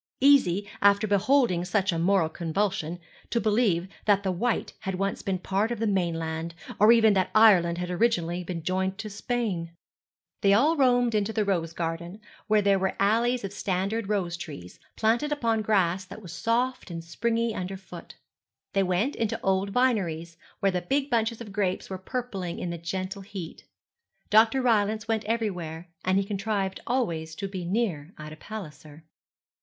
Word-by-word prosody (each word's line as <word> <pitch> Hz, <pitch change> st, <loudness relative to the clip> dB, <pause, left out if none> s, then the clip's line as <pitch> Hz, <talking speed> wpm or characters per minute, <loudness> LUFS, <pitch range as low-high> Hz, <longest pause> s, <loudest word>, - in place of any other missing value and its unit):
Easy, 205 Hz, -9 st, +4 dB
after 200 Hz, +1 st, +5 dB
beholding 205 Hz, -2 st, +2 dB
such 190 Hz, +2 st, +1 dB
a 165 Hz, -, -2 dB
moral 180 Hz, -1 st, +3 dB
convulsion, 170 Hz, +1 st, -2 dB, 0.3 s
to 235 Hz, -, +1 dB
believe 210 Hz, -6 st, +2 dB, 0.2 s
that 205 Hz, -1 st, +3 dB
the 190 Hz, -, 0 dB
Wight 225 Hz, +7 st, -1 dB
had 190 Hz, -1 st, -3 dB
once 195 Hz, +1 st, -2 dB
been 190 Hz, -1 st, -1 dB
part 195 Hz, +4 st, 0 dB
of 240 Hz, -, -2 dB
the 225 Hz, -, -1 dB
mainland; 165 Hz, -4 st, -1 dB, 0.2 s
or 210 Hz, +3 st, +7 dB
even 225 Hz, -2 st, +6 dB
that 190 Hz, -2 st, +1 dB
Ireland 185 Hz, -6 st, +6 dB
had 180 Hz, 0 st, -3 dB
originally 180 Hz, -4 st, +1 dB
been 170 Hz, -2 st, -5 dB
joined 190 Hz, +2 st, -1 dB
to 215 Hz, -1 st, -6 dB
Spain. 200 Hz, -6 st, -2 dB, 0.7 s
They 200 Hz, 0 st, +5 dB
all 290 Hz, +10 st, +4 dB
roamed 245 Hz, -4 st, +3 dB
into 210 Hz, 0 st, +1 dB
the 215 Hz, -1 st, 0 dB
rose 170 Hz, -5 st, 0 dB
garden, 170 Hz, +3 st, -4 dB, 0.3 s
where 215 Hz, -1 st, +3 dB
there 200 Hz, -1 st, +3 dB
were 190 Hz, 0 st, -1 dB
alleys 235 Hz, +4 st, +2 dB
of 195 Hz, 0 st, -5 dB
standard 195 Hz, +3 st, -2 dB
rose 185 Hz, -5 st, 0 dB
trees, 140 Hz, -, -9 dB, 0.2 s
planted 235 Hz, +7 st, +1 dB
upon 230 Hz, -6 st, +1 dB
grass 190 Hz, -4 st, +1 dB
that 200 Hz, -, -10 dB
was 170 Hz, -3 st, -9 dB
soft 240 Hz, +4 st, -1 dB
and 165 Hz, -1 st, -6 dB
springy 230 Hz, +6 st, -1 dB
under 185 Hz, 0 st, -4 dB
the 190 Hz, -, -12 dB
foot. 175 Hz, -2 st, -11 dB, 0.6 s
They 195 Hz, -, +3 dB
went 190 Hz, +9 st, 0 dB
into 225 Hz, -2 st, -1 dB
the -, -, -9 dB
old 195 Hz, +1 st, +1 dB
vineries, 190 Hz, -9 st, 0 dB, 0.3 s
where 195 Hz, -1 st, +3 dB
the 180 Hz, -1 st, -1 dB
big 275 Hz, +4 st, -1 dB
bunches 230 Hz, 0 st, 0 dB
of 215 Hz, -3 st, -8 dB
grapes 195 Hz, -2 st, -1 dB
were 190 Hz, -, -4 dB
purpling 195 Hz, -5 st, -4 dB
in 175 Hz, -, -3 dB
the 170 Hz, -, -5 dB
gentle 185 Hz, +3 st, -4 dB
heat. 190 Hz, -4 st, -8 dB, 0.7 s
Dr. 225 Hz, +5 st, +5 dB
Rylance 215 Hz, -2 st, +2 dB
went 220 Hz, -2 st, 0 dB
everywhere, 180 Hz, -7 st, -3 dB
and 185 Hz, +1 st, +2 dB
he 200 Hz, -, +2 dB
contrived 200 Hz, -1 st, -2 dB
always 165 Hz, -11 st, -1 dB
to 195 Hz, -, -4 dB
be 190 Hz, -2 st, -5 dB
near 180 Hz, -5 st, -2 dB
Ida 155 Hz, 0 st, -9 dB
Palliser. 155 Hz, -6 st, -9 dB
195 Hz, 175 wpm, -27 LUFS, 175-225 Hz, 0.7 s, or